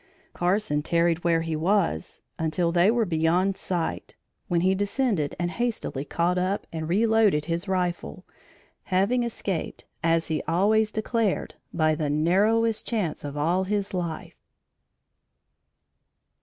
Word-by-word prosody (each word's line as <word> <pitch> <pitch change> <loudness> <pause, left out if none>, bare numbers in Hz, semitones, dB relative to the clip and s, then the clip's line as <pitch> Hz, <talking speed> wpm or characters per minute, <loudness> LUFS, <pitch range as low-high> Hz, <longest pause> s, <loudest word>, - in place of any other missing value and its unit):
Carson 175 -4 0
tarried 170 +1 +1
where 165 -1 +2
he 165 -1 -2
was 170 - 0 0.2
until 160 +2 0
they 175 +3 +4
were 230 0 +2
beyond 175 +3 +1
sight, 175 -3 -3 0.3
when 170 -1 +1
he 185 +2 +3
descended 200 - 0
and 175 0 -1
hastily 230 - -2
caught 175 +4 0
up 185 +2 -1
and 160 -1 -4
reloaded 215 -5 +3
his 170 +4 -3
rifle, 180 0 -2 0.6
having 200 +6 +2
escaped, 210 -7 -4 0.2
as 165 0 +2
he 155 -2 -1
always 210 +6 +2
declared, 220 -1 -1 0.2
by 155 -2 +2
the 150 -1 -1
narrowest 210 +9 +2
chance 205 -9 -2
of 145 0 -5
all 175 +6 +1
his 200 0 -2
life. 170 -3 -5
180 Hz, 130 wpm, -26 LUFS, 165-205 Hz, 0.6 s, they